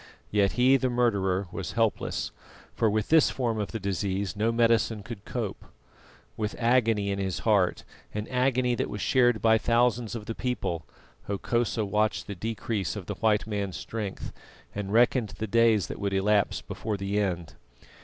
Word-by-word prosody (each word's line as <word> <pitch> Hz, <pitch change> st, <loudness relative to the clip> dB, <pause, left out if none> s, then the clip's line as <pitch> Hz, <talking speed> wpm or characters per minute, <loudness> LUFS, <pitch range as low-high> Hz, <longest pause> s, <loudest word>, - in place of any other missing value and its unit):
Yet 100 Hz, -2 st, +2 dB
he, 130 Hz, +2 st, +5 dB
the 130 Hz, -1 st, 0 dB
murderer, 100 Hz, -6 st, +1 dB
was 95 Hz, -, -5 dB
helpless, 115 Hz, -1 st, 0 dB, 0.4 s
for 110 Hz, -, +2 dB
with 105 Hz, 0 st, -1 dB
this 160 Hz, -1 st, +6 dB
form 115 Hz, -4 st, -1 dB
of 105 Hz, -, -3 dB
the 115 Hz, -, -4 dB
disease 100 Hz, +1 st, -2 dB
no 110 Hz, +2 st, +1 dB
medicine 115 Hz, -2 st, +2 dB
could 115 Hz, -3 st, -9 dB
cope. 115 Hz, -6 st, -4 dB, 0.7 s
With 105 Hz, -1 st, -3 dB
agony 115 Hz, -4 st, +2 dB
in 100 Hz, -, -2 dB
his 95 Hz, -2 st, -2 dB
heart, 100 Hz, -5 st, +2 dB, 0.3 s
an 105 Hz, +1 st, -4 dB
agony 125 Hz, -1 st, +2 dB
that 120 Hz, -, -1 dB
was 105 Hz, -, -5 dB
shared 120 Hz, -1 st, +3 dB
by 110 Hz, 0 st, +5 dB
thousands 120 Hz, -1 st, +1 dB
of 110 Hz, -2 st, -6 dB
the 115 Hz, -, -4 dB
people, 100 Hz, -, -3 dB, 0.4 s
Hokosa 110 Hz, +2 st, 0 dB
watched 105 Hz, +2 st, 0 dB
the 100 Hz, -, -5 dB
decrease 105 Hz, -1 st, -3 dB
of 100 Hz, -4 st, -6 dB
the 105 Hz, -, -4 dB
white 105 Hz, +1 st, +1 dB
man's 100 Hz, -3 st, -3 dB
strength, 105 Hz, -4 st, -5 dB, 0.4 s
and 100 Hz, -1 st, -4 dB
reckoned 120 Hz, 0 st, +3 dB
the 110 Hz, -, -2 dB
days 115 Hz, -1 st, +3 dB
that -, -, -7 dB
would 100 Hz, -1 st, -1 dB
elapse 100 Hz, +1 st, +2 dB
before 110 Hz, -2 st, -4 dB
the 100 Hz, +1 st, -1 dB
end. 90 Hz, -5 st, -2 dB
110 Hz, 170 wpm, -27 LUFS, 100-115 Hz, 0.7 s, this